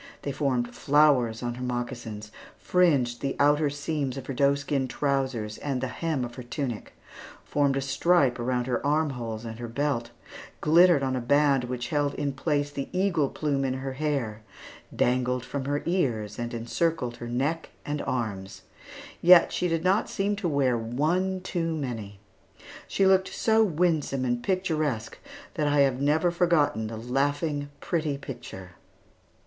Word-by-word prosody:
They 140 - -2
formed 130 -4 -1
flowers 135 -6 +3
on 120 0 -2
her 125 +1 -7
moccasins; 120 -4 -4 0.3
fringed 140 -10 +2
the 135 - -2
outer 145 +1 +4
seams 145 -2 -3
of 135 - -6
her 135 - -4
doeskin 140 0 +1
trousers 130 -5 -1
and 140 -3 -2
the 130 0 -2
hem 150 -1 -2
of 120 - -8
her 125 - -8
tunic; 120 -2 -5 0.5
formed 140 -2 +1
a - - 0
stripe 135 -1 +2
around 125 0 0
her 125 -1 -1
arm 150 +1 +1
holes 115 -3 -5
and 115 0 -7
her 120 - -5
belt; 120 -1 -1 0.5
glittered 165 -1 +5
on 130 -1 0
a 125 - -2
band 140 0 +3
which 125 -1 -4
held 145 -2 0
in 140 -2 -2
place 145 +1 -1
the 140 -1 -5
eagle 180 -7 +1
plume 140 -3 -1
in 130 -1 -1
her 135 0 -4
hair; 130 -7 -2 0.5
dangled 125 0 +1
from 140 -2 -4
her 145 +1 -1
ears; 120 - -1
and 120 0 -3
encircled 120 +1 -1
her 120 - -7
neck 140 +7 -1 0.2
and 145 0 -2
arms. 100 -6 -3 0.6
Yet 175 0 +7
she 180 - 0
did 165 -1 -1
not 190 +4 +2
seem 200 +1 0
to 190 -4 -1
wear 135 -4 +2
one 155 +12 0
too 165 -3 -2
many. 115 -9 -5 0.7
She 195 - +1
looked 190 0 +4
so 220 0 +3
winsome 160 -7 0
and 120 -1 0
picturesque 155 - -1 0.3
that 150 -4 0
I 145 0 +3
have 135 -1 +2
never 155 +4 +2
forgotten 170 -10 +2
the 110 0 -6
laughing, 145 +5 -1
pretty 155 -5 -1
picture. 95 -9 -9
140 Hz, 160 wpm, -27 LUFS, 120-155 Hz, 0.7 s, Yet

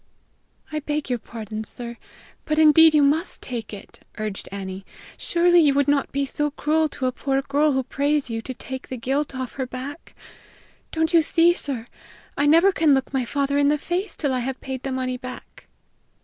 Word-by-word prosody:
"I 305 - -1
beg 295 -2 -3
your 245 - 0
pardon, 220 -1 -7
sir, 235 +2 -9 0.5
but 310 0 -1
indeed 315 +1 +7
you 295 - +5
must 310 +6 +1
take 235 -4 -5
it," 205 -1 -11 0.2
urged 215 -2 -5
Annie. 190 -1 -6 0.3
"Surely 350 0 +3
you 290 -4 +4
would 285 0 +2
not 285 -1 +1
be 280 0 0
so 295 +2 -1
cruel 310 +2 +1
to 265 - -4
a 255 - +2
poor 270 +1 -1
girl 290 +2 +2
who 265 0 +1
prays 285 +2 0
you 225 -1 -3
to 260 - -6
take 260 +1 -7
the 255 - -5
guilt 270 +3 -2
off 260 -1 -4
her 260 - -2
back. 265 +5 -8 0.8
Don't 320 +1 0
you 335 - +7
see, 335 +2 +4
sir, 265 -9 -4 0.5
I 290 - +2
never 335 +6 +6
can 315 -6 +4
look 265 +1 -2
my 260 -2 0
father 280 +2 0
in 285 - +4
the 300 +1 +3
face 360 +7 -3
till 285 -4 -1
I 255 - 0
have 260 +1 -3
paid 265 -1 -5
the 270 - -4
money 255 -1 -2
back!" 255 0 -10
275 Hz, 200 wpm, -23 LUFS, 255-300 Hz, 0.8 s, indeed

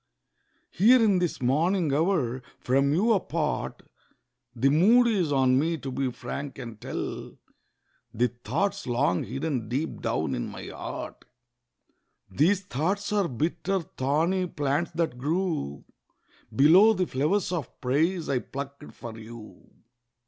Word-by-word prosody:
Here 240 +7 +6
in 205 -5 +4
this 175 -7 -2
morning 160 +4 +2
hour, 145 -6 +1 0.2
from 135 +2 +2
you 210 +9 +3
apart, 165 -6 -2 0.7
The 130 +4 +3
mood 210 - +5
is 195 -10 +1
on 130 -2 +3
me 165 +3 0
to 135 -3 -6
be 135 0 -1
frank 135 +3 -6
and 115 -5 -8
tell - - -5 0.7
The 120 +2 +1
thoughts 195 - -1
long 120 -7 +1
hidden 135 -6 -3
deep 140 +7 -3
down - - -1
in - - -2
my - - -8
heart. - - -7 1.1
These 180 +7 +3
thoughts 190 +6 -2
are 200 -3 +2
bitter—thorny 165 +3 -1
plants, 145 +1 -1
that 160 -7 -1
grew 155 - -2 0.7
Below 180 +11 +7
the 185 -3 0
flowers 160 +7 0
of 165 -8 -4
praise 160 +7 0
I 135 -3 +1
plucked 140 +3 -8
for 115 -2 -9
you. 110 0 -12
150 Hz, 125 wpm, -27 LUFS, 130-185 Hz, 1.1 s, Below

